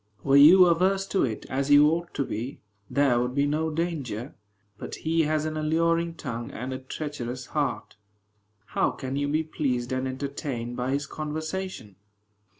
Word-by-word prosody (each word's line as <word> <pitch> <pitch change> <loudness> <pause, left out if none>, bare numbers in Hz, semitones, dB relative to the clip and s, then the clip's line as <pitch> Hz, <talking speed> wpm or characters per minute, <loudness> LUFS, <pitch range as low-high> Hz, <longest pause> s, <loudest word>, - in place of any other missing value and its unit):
Were 135 - +3
you 165 +6 +9
averse 185 +3 +2
to 195 - +2
it, 110 -4 -5
as 135 +1 -2
you 145 +1 +7
ought 170 +1 -2
to 140 - 0
be, 120 +6 -5 0.3
there 140 -4 +3
would 125 +1 -2
be 140 0 +3
no 155 +2 0
danger. 150 -7 -3 0.5
But - - -6
he 160 0 +1
has 155 0 0
an 155 0 -3
alluring 165 +2 +1
tongue 120 -6 -5
and 125 +3 -5
a 130 - -4
treacherous 130 -2 -5
heart. 140 -8 -3 0.7
How - - +1
can 130 0 -5
you 145 0 0
be 155 +2 +1
pleased 130 -6 -2
and 130 0 -1
entertained 130 -3 -4
by 125 +1 -2
his 140 +1 0
conversation? 155 - -5
145 Hz, 165 wpm, -26 LUFS, 130-160 Hz, 0.7 s, you